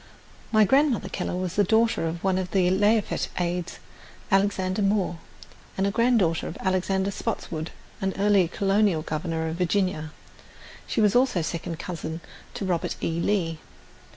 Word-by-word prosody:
My 215 -1 +6
Grandmother 270 +1 +2
Keller 180 - -3
was 185 +1 -3
a - - +6
daughter 220 -3 +2
of 165 +1 -5
one 190 -1 +2
of 185 - -2
Lafayette's 195 +4 +2
aides, 175 0 -2 0.5
Alexander 195 0 +1
Moore, 195 -4 +1 0.6
and 195 +1 +1
granddaughter 225 -8 +2
of - - -7
Alexander 190 +1 0
Spotswood, 165 -7 -4 0.3
an 190 0 -1
early 200 -3 +4
Colonial 195 -3 +1
Governor 160 +1 -2
of 160 +1 -4
Virginia. 180 -3 0 0.8
She 225 - 0
was 210 0 +3
also 245 -9 +3
second 165 +1 -4
cousin 165 -2 -5 0.4
to 200 - -3
Robert 175 -3 -1
E. 165 0 -2
Lee. 170 -4 0
185 Hz, 140 wpm, -25 LUFS, 170-205 Hz, 0.8 s, My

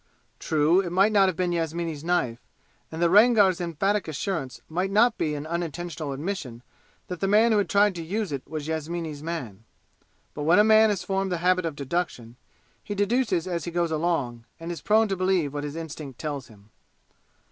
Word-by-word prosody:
True, 160 +4 +3
it 180 - -4
might 195 +5 +3
not 195 -4 +3
be 185 - 0
Yasmini's 165 -2 -2
knife, 130 -10 0 0.5
and 160 - -6
the - - +5
Rangar's 205 -3 +5
emphatic 195 +5 -1
assurance 155 -4 -3
might 180 +4 -1
not 220 +4 +4
be 150 -1 -1
an 145 +1 -5
unintentional 170 -2 -4
admission 135 -5 -5 0.4
that 180 -2 -6
the 195 - 0
man 215 +4 +4
who 215 - +4
had 200 - -1
tried 205 0 +4
to 170 - -6
use 195 +3 -3
it 140 -2 -3
was 155 0 -5
Yasmini's 160 -1 -4
man. 130 - -6 0.7
But 150 - -6
when 160 +4 +4
a 210 - +7
man 220 0 +6
has 195 -4 -1
formed 195 +1 -1
the 175 - 0
habit 180 +1 +2
of 155 - -5
deduction, 140 -5 -3 0.5
he 205 - -5
deduces 205 -4 +1
as 175 -2 -3
he - - -3
goes 170 -1 -1
along, 150 -8 -1
and 165 +1 -5
is 165 -4 -6
prone 220 +1 +3
to 195 - -1
believe 185 -6 0
what 145 0 -4
his 145 0 -5
instinct 150 -5 -7
tells 145 -5 -5
him. 105 -2 -19
170 Hz, 190 wpm, -25 LUFS, 150-195 Hz, 0.7 s, a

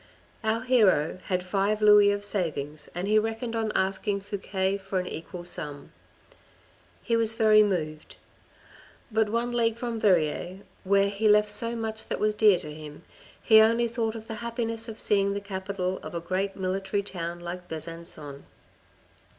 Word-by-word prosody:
Our 220 +2 0
hero 205 -11 +3
had 180 -2 -1
five 200 +3 0
louis 210 -1 +7
of 205 0 -1
savings 155 -7 -1
and 180 +2 -3
he 215 +1 +4
reckoned 225 +2 -3
on 220 -1 -1
ask 190 0 -1
ing 200 -1 +1
Fouque 195 -1 -2
for 195 0 -4
an 180 - -3
equal 175 +1 -7
sum. 145 -4 -4 1.1
He 230 - +1
was 225 -1 +2
very 215 -1 +6
moved. 155 -7 -2 1.0
But 220 -1 +2
one 235 +2 -1
league 230 -2 +1
from 235 -1 -4
Verrieres, 180 -1 +1 0.2
where 200 +1 +3
he 210 +2 +1
left 210 0 +4
so 230 +3 -1
much 220 -1 -5
that - - -3
was 215 0 +2
dear 210 -3 +5
to 150 -3 -6
him, 150 -1 -10 0.4
he 220 -1 +7
only 230 +2 +3
thought 230 -1 -2
of 220 0 -8
the 225 - -5
happiness 230 -1 -3
of 225 - -8
seeing 200 -1 +2
the - - -1
capital 190 -2 -4
of - - -8
a - - -1
great 185 +3 -2
military 195 +1 -2
town 175 -3 -5
like 175 +1 -7
Besancon. 160 -3 -7
200 Hz, 165 wpm, -27 LUFS, 180-220 Hz, 1.1 s, louis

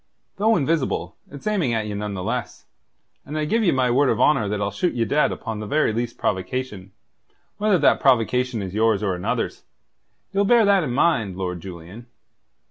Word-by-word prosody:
"Though 220 +3 +3
invisible, 155 -3 -1
it's 140 -1 -11
aiming 185 - 0
at 110 -1 -1
ye 105 - -4
none 105 0 -4
the 90 - -4
less, - - -4 0.6
and 150 +2 -6
I 155 - 0
give 225 +9 +1
you 185 - +3
my 130 -2 +1
word 135 +2 +3
of - - 0
honour 135 -9 +3
that 105 0 -2
I'll 100 0 -1
shoot 180 -2 -1
ye 115 -1 +1
dead 150 +6 +2
upon 110 -2 -5
the 105 - -6
very 150 -3 +1
least 120 +1 -3
provocation, 105 0 -3 0.7
whether 210 -2 +3
that 150 - +3
provocation 125 -2 +2
is 95 -1 -6
yours 110 -1 +2
or 95 -2 0
another's. 90 0 -3 0.7
Ye'll 200 +1 +2
bear 230 +2 +4
that 200 -3 +4
in 130 - -3
mind, 115 - +1
Lord 90 -2 -3
Julian. 95 +6 -10
120 Hz, 195 wpm, -22 LUFS, 105-155 Hz, 0.7 s, bear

